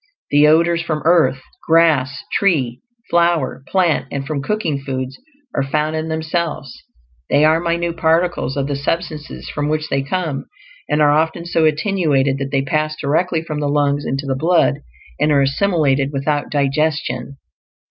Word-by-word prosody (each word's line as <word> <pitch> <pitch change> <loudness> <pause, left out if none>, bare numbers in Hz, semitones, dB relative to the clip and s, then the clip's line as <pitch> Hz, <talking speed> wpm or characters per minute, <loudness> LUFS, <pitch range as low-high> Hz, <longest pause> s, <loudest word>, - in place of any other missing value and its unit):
The 145 +1 +5
odors 170 +2 +3
from 155 -3 -3
earth, 160 -6 +3 0.2
grass, 155 -5 +3
tree, 135 -11 +1 0.3
flower, 170 -6 +1
plant, 180 -5 +1
and 140 -1 -4
from 140 -1 -3
cooking 160 -4 -1
foods 130 -1 -4 0.3
are - - 0
foods 150 +3 -1
in 160 0 -2
themselves; 160 -4 -3 0.6
they 145 +2 +4
are 160 +1 +4
minute 170 0 -1
particles 165 -3 +1
of 140 - 0
the 140 0 -2
substances 155 +1 -4
from 145 0 -2
which 155 0 -1
they 135 - +1
come, 155 -1 -3 0.4
and 150 0 +2
are 145 - +5
often 160 +3 0
so 165 -2 +1
attenuated 150 -5 +1
that 135 0 -3
they 135 -1 0
pass 155 +2 -1
directly 160 +3 0
from 155 -2 -4
the 145 -1 -1
lungs 145 0 +1
into 135 +1 -3
the 135 - -1
blood, 155 0 +2 0.4
and 150 +1 +2
are 140 -2 +4
assimilated 140 -3 +1
without 145 +1 -1
digestion. 140 -2 -1
150 Hz, 160 wpm, -18 LUFS, 140-165 Hz, 0.6 s, The